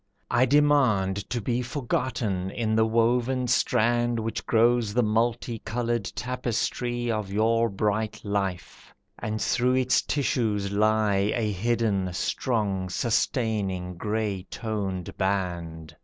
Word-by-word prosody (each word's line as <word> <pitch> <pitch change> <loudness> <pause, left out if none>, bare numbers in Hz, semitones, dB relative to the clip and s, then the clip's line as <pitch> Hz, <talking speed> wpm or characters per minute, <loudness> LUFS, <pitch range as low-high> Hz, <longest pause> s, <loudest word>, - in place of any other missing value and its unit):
I 125 +2 +4
demand 120 -9 +3
To 120 - -1
be 120 +3 -1
forgotten 120 -7 -2
in 110 +1 -1
the 110 0 +3
woven 120 +3 +1
strand 120 0 +2
Which 115 0 -3
grows 115 -2 +3
the 125 - +4
multi 115 +1 0
coloured 120 -1 -2
tapestry 120 -1 -2
Of 105 -3 -3
your 115 +3 +2
bright 105 +2 -1
life, 100 -4 -4 0.2
and 110 0 -3
through 125 +3 +2
its 130 0 +3
tissues 110 -8 0
lie 105 -1 +2
A 110 -3 0
hidden, 105 -2 0
strong, 100 -3 -1
sustaining, 100 -4 -1
grey 105 -1 -2
toned 100 -5 -4
band. 85 -5 -2
110 Hz, 115 wpm, -26 LUFS, 100-120 Hz, 0.2 s, I